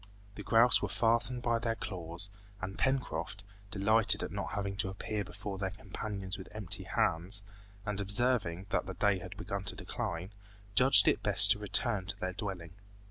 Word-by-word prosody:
The 105 - -8
grouse 115 +4 +5
were 105 - -2
fastened 115 +5 +2
by 115 -1 +1
their 115 -1 -1
claws, 90 -3 -2 0.3
and 95 0 -5
Pencroft, 105 -8 -2 0.3
delighted 105 +2 +3
at - - -5
not - - -5
having 100 -1 -3
to 100 -2 -1
appear 105 +2 -4
before 95 +2 -7
their 95 -1 -1
companions 100 -1 -5
with 95 - -9
empty 105 -5 -1
hands, 95 +6 +1 0.4
and 105 -1 -2
observing 100 -4 0
that - - 0
the 95 - -6
day 100 +1 +2
had 90 +2 -9
begun 100 -2 -4
to 95 - -3
decline, 90 -1 -5 0.4
judged 130 +6 +6
it - - +3
best - - +7
to - - +2
return 95 -3 0
to - - -3
their 95 0 -3
dwelling. 95 -3 -6
100 Hz, 175 wpm, -32 LUFS, 95-110 Hz, 0.4 s, best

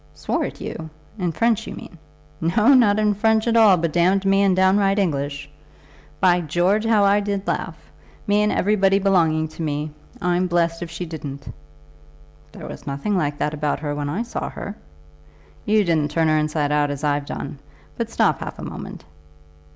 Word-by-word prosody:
"Swore - - -2
at - - -7
you! 160 0 -6 0.3
In 180 -2 0
French 225 +4 0
you - - -6
mean?" - - -11 0.6
"No; 235 +6 +6
not 220 -6 +5
in 210 -1 +2
French 220 +2 +1
at 230 - +2
all, 215 -5 +6
but 165 -2 -2
damned 185 +3 +2
me 195 0 +3
in 195 -2 +3
downright 195 +1 +3
English. 145 -6 -1 0.7
By 180 -2 +4
George, 175 +7 +1
how 220 -2 +3
I 200 +1 +4
did 200 -1 -3
laugh! - - -2 0.5
me 205 -1 +2
and 210 0 +2
everybody 195 -1 +2
belonging 165 -5 +2
to 155 - -10
me. 150 -1 -2 0.3
I'm 180 +1 +1
blessed 170 -1 0
if 170 - -5
she 175 +2 -5
didn't." 145 -4 -8 1.0
"There - - -10
was - - -9
nothing 140 +10 -2
like 145 -5 -1
that 150 - -1
about 150 -2 -1
her 145 -2 -2
when 145 0 -3
I 190 +10 -2
saw 235 - -5
her." 200 - -7 0.9
"You 215 0 +3
didn't 160 -5 +1
turn 160 +1 +1
her 155 - +3
inside 150 -1 -1
out 150 -1 +2
as 145 +1 -5
I've 145 -1 0
done; - - -6 0.4
but - - -3
stop - - +1
half - - -7
a - - -8
moment." - - -8
180 Hz, 185 wpm, -22 LUFS, 150-205 Hz, 1.0 s, No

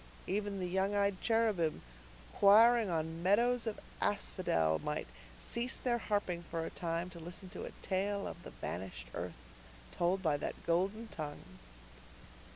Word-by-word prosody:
Even 200 0 -1
the 185 - -1
young 190 +3 +1
eyed 200 -1 +1
cherubim, 215 -9 +2 0.6
choiring 225 +2 +7
on 160 0 -2
meadows 235 +6 +3
of 215 - -2 0.2
asphodel, 80 - +1
might - - -2 0.3
cease 235 - 0
their 240 -2 +1
harping 185 -4 -1
for 165 -1 -4
a - - -5
time 170 0 -2
to 170 - -9
listen 180 +3 -8
to 180 - -6
a - - -7
tale 200 +1 0
of - - -6
the - - -9
vanished 85 -10 -6
earth, - - -4 0.5
told 185 +3 +1
by 155 -4 +3
that 145 - -5
golden 195 +7 +1
tongue. 150 -5 -7
190 Hz, 150 wpm, -34 LUFS, 165-205 Hz, 0.6 s, choiring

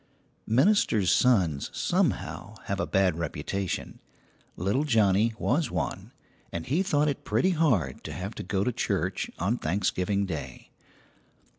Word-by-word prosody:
Ministers' 115 - +3
sons, 95 - +3
somehow, 100 +5 -1
have 100 -1 -3
a - - -1
bad 95 -4 +2
reputation. 85 +4 -3 0.6
Little 100 - 0
Johnnie 110 -4 +3
was 160 +1 +1
one - - -3 0.4
and 85 -1 -4
he 150 +8 +1
thought 150 -6 +2
it 140 - -2
pretty 115 - +2
hard 125 - +1
to - - -5
have 95 +4 -5
to - - -6
go 95 +1 -1
to 125 - +1
church - - -1
on 105 +7 0
Thanksgiving 100 +3 0
Day. 80 -6 -7
100 Hz, 135 wpm, -27 LUFS, 90-125 Hz, 0.6 s, Ministers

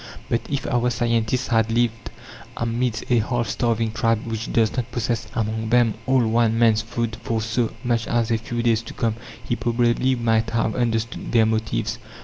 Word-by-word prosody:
But 115 - +1
if 140 -2 -2
our 125 0 +1
scientist 120 +1 0
had 115 -2 +2
lived 115 -1 0 0.5
amidst 115 0 -1
a 120 - +5
half 120 +2 -1
starving 115 -2 0
tribe 115 0 0
which 115 0 -4
does 110 -2 +2
not 125 -1 -3
possess 115 -1 -2
among 110 0 -1
them 120 -2 +4
all 130 -2 +3
one 115 0 +2
man's 115 -2 +4
food 115 0 -3
for 115 -1 -1
so 115 +1 -1
much 120 -2 0
as 120 -1 0
a 115 - +2
few 120 +1 -3
days 115 -2 +3
to 115 - -10
come, 115 -2 0 0.3
he 120 - +1
probably 120 +2 +1
might 115 -2 +1
have 115 -1 0
understood 115 -1 -1
their 115 -2 +5
motives. 110 0 -1
115 Hz, 180 wpm, -23 LUFS, 110-120 Hz, 0.5 s, a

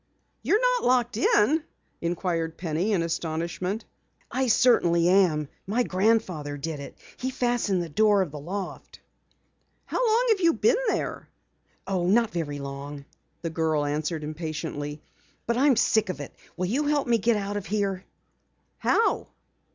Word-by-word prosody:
"You're 420 - +2
not - - +2
locked 245 -2 +2
in?" 255 +7 +3 0.4
inquired 170 -1 -2
Penny 175 +4 -1
in 185 -5 +2
astonishment. 170 +5 -3 0.5
"I 265 0 0
certainly 175 -8 +4
am! 175 -6 +3 0.2
My 230 +5 +1
grandfather 185 -8 0
did 155 +1 -4
it. 140 - -9 0.2
He 260 - -2
fastened 240 -8 0
the - - -5
door 205 +4 +4
of 165 - -7
the 150 - -7
loft." 185 +5 -6 0.9
"How - - -1
long 465 +1 +3
have 435 -3 +4
you 335 -2 +4
been 475 +6 +2
there?" - - -2 0.6
"Oh, 185 -3 -1
not 225 +4 +3
very 155 -4 -3
long," 140 +1 -7 0.4
the 165 - -2
girl 160 -3 0
answered 155 +2 -2
impatiently, 150 -1 -5 0.4
"but 235 - 0
I'm 270 +1 +4
sick 220 -2 +2
of 185 - -4
it! 145 - -7 0.2
Will 180 - 0
you 260 +11 0
help 290 -2 +1
me 230 -3 +2
out 205 0 -3
of 200 - -5
here?" 200 -2 -1 0.8
"How?" 455 - +2
185 Hz, 150 wpm, -26 LUFS, 160-235 Hz, 0.9 s, certainly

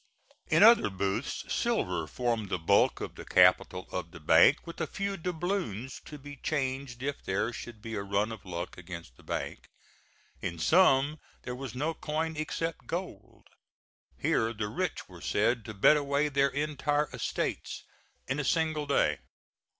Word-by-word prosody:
In - - +5
other 230 - +7
booths 95 0 -2
silver - - 0
formed 115 -5 -1
the 90 - 0
bulk 80 - +3
of - - -5
the - - -9
capital 90 - +4
of 90 -2 -3
the 85 - -11
bank, 80 - +5
with 170 0 -7
a 160 - 0
few 200 +4 -3
doubloons 170 - -3
to 150 - -8
be 145 +1 -10
changed 130 -4 -2
if 140 0 -3
there 100 +5 -1
should 110 -2 -9
be 115 - -6
a 105 - -2
run 100 +2 0
of 110 -2 -8
luck 85 -2 -5
against 85 -7 -9
the - - -18
bank. - - -5 0.7
In 85 -2 -3
some 150 - +4 0.2
there 125 - -4
was 125 -2 -6
no 150 +5 -1
coin 160 +1 -2
except 165 +2 -3
gold. 180 +3 -6 0.7
Here 115 +1 +1
the 105 -2 -3
rich - - -3
were - - -13
said 120 -2 +1
to 110 - -6
bet 150 +10 +6
away 145 +1 +1
their 140 -1 +3
entire 145 +1 0
estates - - -3 0.4
in 130 +3 -1
a - - 0
single 155 +1 +1
day. 140 - +2
135 Hz, 165 wpm, -30 LUFS, 105-150 Hz, 0.7 s, other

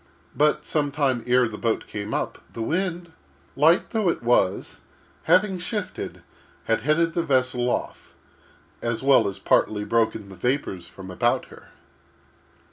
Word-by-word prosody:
But, 150 0 +2
some 145 -2 0
time 135 -5 0
ere 125 0 +4
the 105 -1 -8
boat 115 -2 -1
came 105 0 -6
up, - - -2
the 115 - -4
wind, 175 +3 -2 0.4
light 160 +5 +4
though 215 -5 +1
it 165 - -2
was, 100 -5 +1 0.4
having 185 +3 +3
shifted, 205 +2 -5 0.4
had 115 0 0
headed 165 +5 +2
the 170 - +1
vessel 130 -4 +1
off, - - -4 0.7
as 115 +1 -2
well 135 0 +5
as 100 - -4
partly 105 -1 +2
broken 110 -2 0
the 95 - -10
vapors 95 -5 -2
from 95 +1 -10
about 90 - +1
her. - - -15
130 Hz, 145 wpm, -24 LUFS, 110-165 Hz, 0.7 s, well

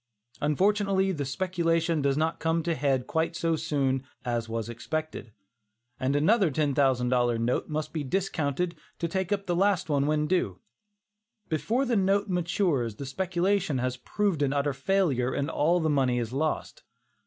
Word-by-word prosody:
Unfortunately 195 +5 +2
the 145 -6 -3
speculation 165 +1 0
does 140 0 +1
not 160 +1 0
come 160 0 0
to 170 - -1
a - - +2
head 135 -5 0
quite 160 +4 -1
so 165 -1 +1
soon 135 -4 0 0.2
as 120 -2 -2
was 115 -1 -3
expected, 120 +1 -5 0.7
and 130 +2 0
another 190 +6 +4
$10,000 130 -5 +2
note 120 +2 0
must 155 0 -3
be 155 -3 -2
discounted 170 0 -1 0.2
to 170 - -1
take 190 +2 -2
up 200 -1 0
the 175 -2 0
last 185 -2 +2
one 140 -1 +2
when 150 0 +1
due. 150 - 0 0.9
Before 225 - 0
this 235 -4 +2
note 200 +2 +2
matures 170 - 0
the 140 - -6
speculation 185 +2 0
has 125 0 -1
proved 185 - -1
an 140 -1 +2
utter 145 0 0
failure 135 -4 +1
and 140 +3 -1
all 170 +4 +2
the 160 - 0
money 135 -5 +2
is 120 0 -3
lost. 155 +3 -2
155 Hz, 165 wpm, -28 LUFS, 135-180 Hz, 0.9 s, another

